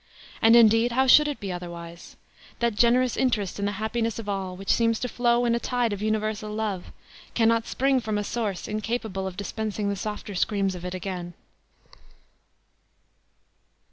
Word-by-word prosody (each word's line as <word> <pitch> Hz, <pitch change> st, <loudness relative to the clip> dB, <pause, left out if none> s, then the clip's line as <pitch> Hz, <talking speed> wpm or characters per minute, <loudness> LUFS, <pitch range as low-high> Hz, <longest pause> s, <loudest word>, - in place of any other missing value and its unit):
And, 225 Hz, +1 st, +7 dB
indeed, 230 Hz, +1 st, +5 dB
how 265 Hz, +2 st, +3 dB
should 300 Hz, +3 st, +7 dB
it 290 Hz, -, -3 dB
be 195 Hz, -2 st, -4 dB
otherwise? 170 Hz, -1 st, -8 dB, 0.4 s
That 235 Hz, -1 st, +1 dB
generous 240 Hz, +3 st, +3 dB
interest 215 Hz, -7 st, 0 dB
in 200 Hz, -, -1 dB
the 205 Hz, -, -1 dB
happiness 220 Hz, +2 st, -2 dB
of 225 Hz, -2 st, -7 dB
all, 190 Hz, -2 st, -3 dB
which 195 Hz, +1 st, +1 dB
seems 230 Hz, -1 st, +2 dB
to 250 Hz, -, -1 dB
flow 240 Hz, 0 st, +1 dB
in 235 Hz, -, +2 dB
a 235 Hz, -, +1 dB
tide 245 Hz, -3 st, 0 dB
of 200 Hz, -, -5 dB
universal 215 Hz, 0 st, -1 dB
love, 210 Hz, -4 st, -3 dB, 0.5 s
cannot 230 Hz, 0 st, +2 dB
spring 270 Hz, 0 st, +2 dB
from 220 Hz, -3 st, -2 dB
a 205 Hz, -, -1 dB
source 205 Hz, -4 st, -3 dB
incapable 215 Hz, -2 st, -3 dB
of 185 Hz, -1 st, -7 dB
dispensing 210 Hz, 0 st, -3 dB
the 200 Hz, -, -1 dB
softer 210 Hz, +1 st, -5 dB
screams 195 Hz, 0 st, 0 dB
of 180 Hz, -1 st, -8 dB
it 180 Hz, 0 st, -4 dB
again." 180 Hz, -2 st, -5 dB
215 Hz, 170 wpm, -26 LUFS, 195-235 Hz, 0.5 s, And